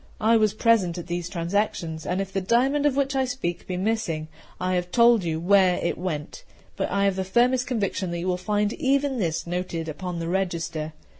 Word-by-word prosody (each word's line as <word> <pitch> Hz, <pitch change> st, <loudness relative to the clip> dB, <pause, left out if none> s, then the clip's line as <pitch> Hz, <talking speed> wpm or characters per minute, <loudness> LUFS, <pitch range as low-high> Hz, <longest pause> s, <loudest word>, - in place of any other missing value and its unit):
I 225 Hz, +2 st, +4 dB
was 215 Hz, -2 st, +3 dB
present 210 Hz, -7 st, +2 dB
at 175 Hz, -, -5 dB
these 175 Hz, 0 st, -3 dB
transactions: 170 Hz, -3 st, -2 dB
and 180 Hz, +1 st, 0 dB
if 195 Hz, 0 st, -4 dB
the 195 Hz, -, 0 dB
diamond 265 Hz, +9 st, +2 dB
of 275 Hz, -, 0 dB
which 275 Hz, 0 st, 0 dB
I 265 Hz, -1 st, +2 dB
speak 245 Hz, -9 st, -4 dB
be 180 Hz, -, -3 dB
missing, 180 Hz, -6 st, -1 dB, 0.3 s
I 185 Hz, 0 st, 0 dB
have 180 Hz, 0 st, -1 dB
told 235 Hz, -1 st, +5 dB
you 160 Hz, -2 st, -1 dB
where 185 Hz, +1 st, +4 dB
it 170 Hz, -, -1 dB
went; 175 Hz, -, -5 dB, 0.3 s
but -, -, -2 dB
I 200 Hz, 0 st, +1 dB
have 195 Hz, -1 st, +2 dB
the 190 Hz, -, 0 dB
firmest 245 Hz, +6 st, +2 dB
conviction 200 Hz, -6 st, -1 dB
that 170 Hz, -, -3 dB
you 175 Hz, -, -3 dB
will 180 Hz, -, +1 dB
find 205 Hz, +3 st, 0 dB
even 275 Hz, -2 st, +1 dB
this 165 Hz, -5 st, -1 dB
noted 175 Hz, -2 st, -3 dB
upon 175 Hz, +3 st, -5 dB
the 165 Hz, 0 st, -3 dB
register. 170 Hz, -4 st, -2 dB
190 Hz, 210 wpm, -25 LUFS, 175-230 Hz, 0.3 s, told